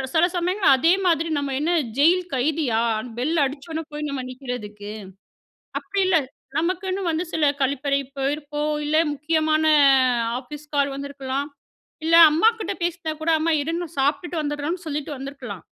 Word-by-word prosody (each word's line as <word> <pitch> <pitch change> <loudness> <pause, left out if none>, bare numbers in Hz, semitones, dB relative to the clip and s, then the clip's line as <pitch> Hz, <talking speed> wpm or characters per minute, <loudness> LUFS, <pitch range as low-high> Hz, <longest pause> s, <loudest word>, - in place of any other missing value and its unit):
சில 325 +2 +5
சமயங்கள் 360 -4 +3
அதே 330 +7 +4
மாதிரி 330 -2 +2
நம்ம 280 -1 -2
என்ன 320 +4 0 0.3
ஜெயில் 350 +5 +5
கைதியா 260 -4 +1 0.4
பெல் 310 +7 0
அடிச்சோன 310 +4 -5
போய் 300 0 -3
நம்ம 275 -2 -3
நிக்கிறதுக்கு. 215 -6 -7 0.9
அப்படி 400 0 -3
இல்ல 370 - +3 0.4
நமக்குன்னு 370 +3 -1
வந்து 325 +3 -1
சில 320 - +1 0.2
கழிப்பறை 275 +1 +1 0.2
போயிருப்போம் 295 +2 -2
இல்ல, 300 +1 +1 0.2
முக்கியமான 310 +1 +1 0.7
ஆஃபீஸ் 295 +4 -10
கால் 280 0 +2
வந்துருக்கலாம், 275 0 -4 0.6
இல்ல 330 +1 +2 0.2
அம்மாகிட்ட 435 +5 +2
பேசினா 345 -2 -2
கூட 330 - +1
"அம்மா, 330 +1 +1
இரும்மா. 335 +4 -2
சாப்பிட்டுட்டு 295 +5 0
வந்துடுறோம்னு" 295 +5 -3
சொல்லிட்டு 300 -1 -3
வந்திருக்கலாம். 260 - -8
300 Hz, 135 wpm, -23 LUFS, 275-330 Hz, 0.9 s, சில